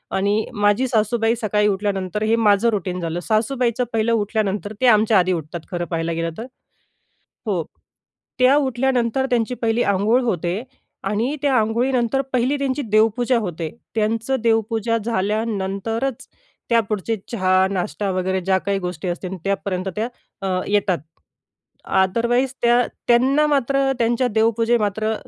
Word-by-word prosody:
आणि 205 +3 +1
माझी 205 +4 +2
सासूबाई 225 0 +1
सकाळी 210 -2 +1
उठल्यानंतर 200 0 -1
हे 220 +1 +3
माझं 215 0 +3
रुटीन 185 -4 -2
झालं. 165 0 -3
सासूबाईचं 235 +5 0
पहिलं 225 +1 +1
उठल्यानंतर 210 -1 -1
ते 255 - +4
आमच्या 215 -2 +5
आधी 185 +1 +2
उठतात 165 0 -5
खरं 175 -1 -2
पाहायला 165 -1 -2
गेलं 165 0 -2
तर 225 - -5 1.0
हो, 185 -6 0 0.8
त्या 255 +2 +5
उठल्यानंतर 260 -2 +1
त्यांची 245 0 0
पहिली 230 0 +1
अंघोळ 205 +6 +2
होते 185 -2 -1 0.4
आणि 225 +8 0
त्या 280 -3 +2
अंघोळीनंतर 240 +3 +1
पहिली 255 +3 +1
त्यांची 275 0 -1
देवपूजा 225 +2 +2
होते. 170 -6 -4 0.3
त्यांचं 225 +4 0
देवपूजा 225 0 +1
झाल्यानंतरच 220 +3 -2 0.4
त्यापुढचे 225 -2 +1 0.2
चहा, 185 -3 +3
नाष्टा 200 +1 -2
वगैरे 185 0 -1
ज्या 190 +1 +2
काही 200 +1 -1
गोष्टी 180 0 -4
असतील 180 +1 -4
त्यापर्यंत 195 -1 -2
त्या 220 +2 0 0.4
अ, 185 -1 0
येतात. 200 -3 +1 0.9
अदरवाईज 235 +7 +1
त्या 240 +1 +4 0.3
त्यांना 265 +5 +4
मात्र 275 -1 +1
त्यांच्या 235 +2 +2
देवपूजा 230 +1 +2
मात्र, 215 +1 0
220 Hz, 135 wpm, -21 LUFS, 195-240 Hz, 1.0 s, आमच्या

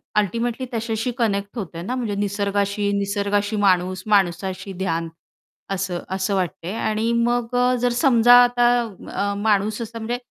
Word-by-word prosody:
Ultimately 230 +5 0
त्याच्याशी 225 +1 -2
connect 205 -1 -1
होतंय 170 -5 -5
ना 245 +8 -3
म्हणजे 225 -5 -2
निसर्गाशी. 200 0 -1
निसर्गाशी 205 +1 -1
माणूस, 185 -2 +1
माणसाशी 190 -1 0
ध्यान 165 -2 -1 0.6
असं, 185 -2 -2
असं 190 +1 -1
वाटतंय. 180 -1 -3
आणि 220 +2 0
मग 240 0 -1
अ, 250 0 +3
जर 245 - +3
समजा 240 -3 +6
आता 245 0 +3 0.4
अ, 200 +1 -1
माणूस 210 +1 +1
असा 230 0 -6
म्हणजे 230 +2 -3
205 Hz, 140 wpm, -22 LUFS, 195-230 Hz, 0.6 s, समजा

